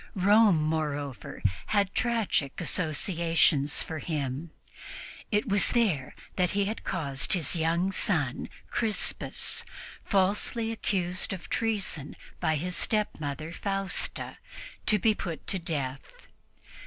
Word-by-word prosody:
Rome, 200 -3 +5
moreover, 145 -7 -3 0.2
had 200 -2 +1
tragic 225 - 0
associations 165 -3 +2
for 160 -1 -5
him. 145 -1 -3 0.8
It 210 +4 +1
was 200 -4 +4
there 190 - +1 0.2
that 180 -2 +3
he 200 - +3
had 215 +3 -4
caused 140 -7 0
his 175 -3 +2
young 170 +3 +1
son 160 -9 +1 0.2
Crispus, 220 -3 0 0.4
falsely 210 +4 +1
accused 185 -4 -1
of 185 - -8
treason 205 -10 -1 0.2
by 160 - +1
his 180 +4 -2
stepmother 155 - -1
Fausta, 195 0 -2 0.5
to 215 - +5
be 215 +2 +3
put 170 -6 -6
to 190 - +2
death. 140 -6 -3
175 Hz, 110 wpm, -28 LUFS, 155-205 Hz, 0.8 s, Rome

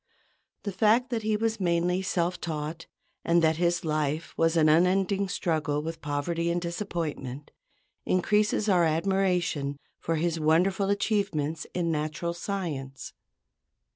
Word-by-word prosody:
The 200 - -3
fact 220 +6 +3
that 230 -2 -1
he 215 0 +1
was 225 0 -1
mainly 175 0 +1
self 180 -2 -1
taught, 160 0 -4 0.4
and 170 0 +3
that 160 0 +3
his 170 0 +1
life 155 0 -1
was 165 +1 +2
an 155 -1 +5
unending 190 +4 +3
struggle 155 -6 -1
with 165 +1 -5
poverty 165 +4 -1
and 170 +1 +1
disappointment, 165 -6 -4 0.5
increases 210 +3 +1
our 180 -4 +4
admiration 170 -4 0 0.2
for 165 - -1
his 165 +1 0
wonderful 180 +6 +2
achievements 195 -7 0
in 170 -2 0
natural 155 +3 -2
science. 165 -8 -5
170 Hz, 130 wpm, -27 LUFS, 155-195 Hz, 0.5 s, an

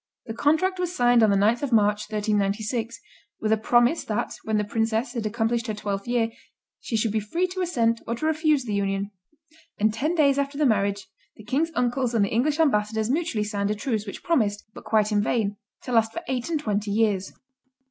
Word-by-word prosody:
The 225 - -5
contract 320 +9 +1
was 360 0 -2
signed 245 -3 +4
on 220 - +5
the 200 - +3
9th 215 +4 +2
of 285 -3 -2
March, 210 -1 +2
1396, 215 +2 -1 0.4
with 215 - -1
a - - +6
promise 240 +7 +2
that, 215 - -2
when 220 -1 0
the 210 - +1
princess 225 +3 -1
had 230 -4 -2
accomplished 230 +2 -1
her 215 - -2
twelfth 200 -1 -4
year, 235 -2 +1 0.5
she 225 - -3
should 220 0 0
be 220 - +1
free 275 - -1
to 370 +1 -4
assent 235 -10 +1
to - - -18
or 235 - -1
refuse 310 0 +1
the 215 - -3
union; 200 0 -1 0.7
and 215 +1 +2
ten 305 +10 -1
days 280 -3 +3
after 280 0 -2
the 300 - +2
marriage, 200 -4 +1 0.3
the 215 - -13
king's 275 +9 0
uncles 245 0 0
and 210 -3 +3
the - - -4
English 290 +7 +1
ambassadors 220 -6 +1
mutually 310 -8 0
signed 205 -1 -2
a 210 - 0
truce, 215 -1 -2
which 200 - -8
promised 215 -11 0
but - - -12
quite 215 -1 +2
in 205 -1 +2
vain 210 -2 0 0.3
to 250 - -6
last 225 -2 +2
for 340 - -5
eight 255 0 -2
and 320 -2 0
twenty 210 -4 -1
years. 205 -2 0
225 Hz, 210 wpm, -25 LUFS, 210-265 Hz, 0.7 s, a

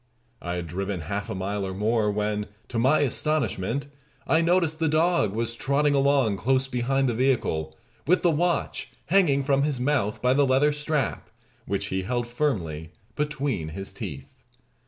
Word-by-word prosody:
I 85 0 -3
had 90 -1 -3
driven 95 +2 -3
half 100 +6 -4
a - - -3
mile 100 +2 -2
or 95 -1 -4
more, 105 +1 +1
when, 105 0 -1 0.2
to 115 - -1
my 130 +6 +4
astonishment, 140 -4 0 0.4
I 160 - +3
noticed 165 -2 +2
the 165 - +2
dog 155 - +2
was 115 +1 -2
trotting 140 +4 +1
along 135 -6 +3
close 130 +4 +2
behind 135 +1 0
the 120 - +1
vehicle 95 -11 0 0.3
with 180 +3 +3
the 175 - +4
watch 170 +2 -1 0.2
hanging 160 -7 +4
from 140 0 +2
his 145 -3 0
mouth 125 -6 0
by 125 +1 +3
the 140 0 +3
leather 135 +3 +4
strap, 150 -2 -2 0.4
which 100 +1 -1
he 95 - 0
held 120 +5 -1
firmly 90 - -2 0.2
between 145 - -2
his 95 +5 -6
teeth. 75 - -7
125 Hz, 165 wpm, -26 LUFS, 100-145 Hz, 0.4 s, my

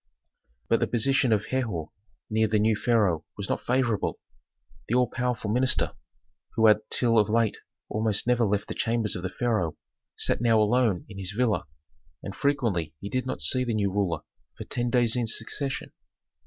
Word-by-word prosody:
But - - +3
the - - +1
position 130 +1 +2
of 105 0 +2
Herhor 110 -12 -2 0.4
near 110 0 +2
the 105 0 +1
new 110 +1 +3
pharaoh 105 -9 +2
was 100 -1 -4
not - - -2
favorable. 125 -4 0 0.7
The 120 - 0
all 125 0 +4
powerful 120 -3 -2
minister, 130 +3 +2 0.6
who 110 - +3
had 105 -1 +6
till 115 -2 +3
of 105 - +2
late 115 0 +2 0.3
almost 110 -1 0
never 120 -1 +3
left 105 -1 0
the - - -4
chambers 115 -3 0
of 90 - -4
the 95 - -3
pharaoh, 105 -7 -1 0.4
sat - - 0
now 115 -2 +4
alone 110 -3 +2
in 100 -1 -9
his 95 +1 -3
villa, 120 -8 +1 0.6
and 100 - -6
frequently 110 - 0
he 100 - -6
did 130 +3 -2
not 130 - -4
see 130 - +3
the 120 -3 -1
new 100 -2 +1
ruler 95 -5 -1 0.4
for - - -6
ten 120 0 -2
days 120 -1 +2
in 120 -2 0
succession. 135 +5 -3
110 Hz, 180 wpm, -27 LUFS, 100-120 Hz, 0.7 s, had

